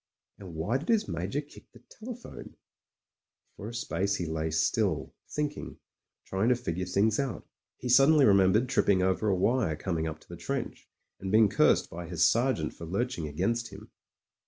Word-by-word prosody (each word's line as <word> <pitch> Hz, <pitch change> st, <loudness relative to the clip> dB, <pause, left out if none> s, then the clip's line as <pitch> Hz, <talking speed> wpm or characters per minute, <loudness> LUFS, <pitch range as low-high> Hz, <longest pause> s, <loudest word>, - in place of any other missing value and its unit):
And 95 Hz, -5 st, -10 dB
why 105 Hz, +12 st, 0 dB
did 155 Hz, -, -9 dB
his 225 Hz, -2 st, +2 dB
Major 90 Hz, -, -2 dB
kick 150 Hz, -, -17 dB
the -, -, -17 dB, 0.2 s
telephone?... 240 Hz, +1 st, -9 dB, 1.0 s
For 105 Hz, -, -7 dB
a -, -, -9 dB
space 100 Hz, 0 st, -1 dB
he 90 Hz, -, -3 dB
lay 80 Hz, 0 st, -2 dB
still, 80 Hz, 0 st, 0 dB, 0.2 s
thinking; 150 Hz, 0 st, -4 dB, 0.5 s
trying 95 Hz, +5 st, 0 dB
to 125 Hz, -, +4 dB
figure 90 Hz, -6 st, -4 dB
things 105 Hz, +5 st, +2 dB
out. 130 Hz, -, -3 dB, 0.3 s
He 125 Hz, -, -6 dB
suddenly 135 Hz, +4 st, +6 dB
remembered 100 Hz, +4 st, +4 dB
tripping 100 Hz, -7 st, +2 dB
over 95 Hz, +3 st, +1 dB
a 100 Hz, -, +3 dB
wire 105 Hz, -3 st, +1 dB
coming 80 Hz, -1 st, -2 dB
up 80 Hz, -1 st, -5 dB
to -, -, -21 dB
the -, -, -9 dB
trench, -, -, -5 dB, 0.3 s
and 95 Hz, -, -4 dB
being 110 Hz, 0 st, +5 dB
cursed -, -, +3 dB
by 85 Hz, +1 st, -7 dB
his 85 Hz, 0 st, +2 dB
sergeant 115 Hz, -, +1 dB
for 85 Hz, -, -9 dB
lurching 100 Hz, -2 st, -2 dB
against 115 Hz, +10 st, -1 dB
him. -, -, -12 dB
100 Hz, 175 wpm, -29 LUFS, 85-125 Hz, 1.0 s, suddenly